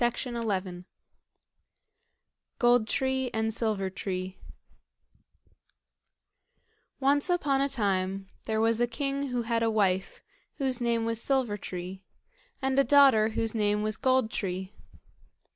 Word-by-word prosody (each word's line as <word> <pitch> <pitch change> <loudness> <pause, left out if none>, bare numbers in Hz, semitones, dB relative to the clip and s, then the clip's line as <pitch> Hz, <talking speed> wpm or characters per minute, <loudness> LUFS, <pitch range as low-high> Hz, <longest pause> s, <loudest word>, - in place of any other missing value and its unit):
Gold 240 -2 +3
Tree 265 0 0
and 220 0 0
Silver 210 -4 -1
Tree 185 -1 -5 2.6
Once 285 +4 +2
upon 285 -6 +1
a 280 - +1
time 195 -5 -1 0.2
there 220 -1 -1
was 225 +1 +2
a 240 - +3
king 275 +3 -2
who 245 -2 -2
had 230 0 0
a 230 - +2
wife, 195 -4 0 0.3
whose 260 -3 -1
name 235 -1 +1
was 230 0 -1
Silver 260 -6 +1
tree, 185 -1 -7 0.6
and 265 0 +2
a - - +6
daughter 265 -5 +5
whose 225 0 -1
name 210 -1 +1
was 215 0 -1
Gold 260 -4 +2
tree. 190 0 -4
225 Hz, 115 wpm, -28 LUFS, 205-265 Hz, 2.6 s, a